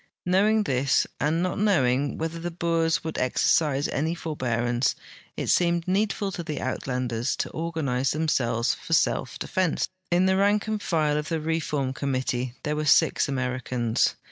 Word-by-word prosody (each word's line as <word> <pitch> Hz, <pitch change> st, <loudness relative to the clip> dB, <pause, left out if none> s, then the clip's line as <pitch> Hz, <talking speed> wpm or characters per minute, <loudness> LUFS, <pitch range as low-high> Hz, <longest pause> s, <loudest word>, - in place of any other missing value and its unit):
Knowing 210 Hz, +4 st, +3 dB
this, 135 Hz, -5 st, +2 dB
and 160 Hz, +4 st, +1 dB
not 185 Hz, +1 st, -2 dB
knowing 140 Hz, -10 st, +2 dB
whether 165 Hz, +1 st, -3 dB
the 175 Hz, +1 st, -3 dB
Boers 165 Hz, -1 st, 0 dB
would 160 Hz, -1 st, -4 dB
exer 125 Hz, -1 st, +1 dB, 0.2 s
cise 140 Hz, +1 st, -1 dB
any 160 Hz, +4 st, 0 dB
forbearance, 120 Hz, -6 st, -1 dB, 0.4 s
it -, -, -2 dB
seemed 170 Hz, -1 st, +2 dB
needful 200 Hz, +1 st, 0 dB
to 175 Hz, -, -5 dB
the 155 Hz, -3 st, -5 dB
Uitlanders 125 Hz, -2 st, -2 dB
to -, -, -3 dB
organize 155 Hz, -6 st, -1 dB
themselves 130 Hz, -7 st, +1 dB
for -, -, -5 dB
self -, -, +1 dB
defense. 185 Hz, -4 st, 0 dB, 0.2 s
In 175 Hz, +1 st, +3 dB
the 190 Hz, 0 st, +3 dB
rank 205 Hz, +1 st, +2 dB
and 215 Hz, -1 st, -2 dB
file 155 Hz, -5 st, +1 dB
of 150 Hz, -, -5 dB
the 165 Hz, -1 st, -1 dB
reform 150 Hz, -4 st, -1 dB
committee 130 Hz, -2 st, -2 dB
there 150 Hz, -1 st, -1 dB
were 155 Hz, -, -1 dB
six 145 Hz, -, +4 dB
Americans. 125 Hz, -3 st, 0 dB
155 Hz, 160 wpm, -26 LUFS, 130-170 Hz, 0.4 s, six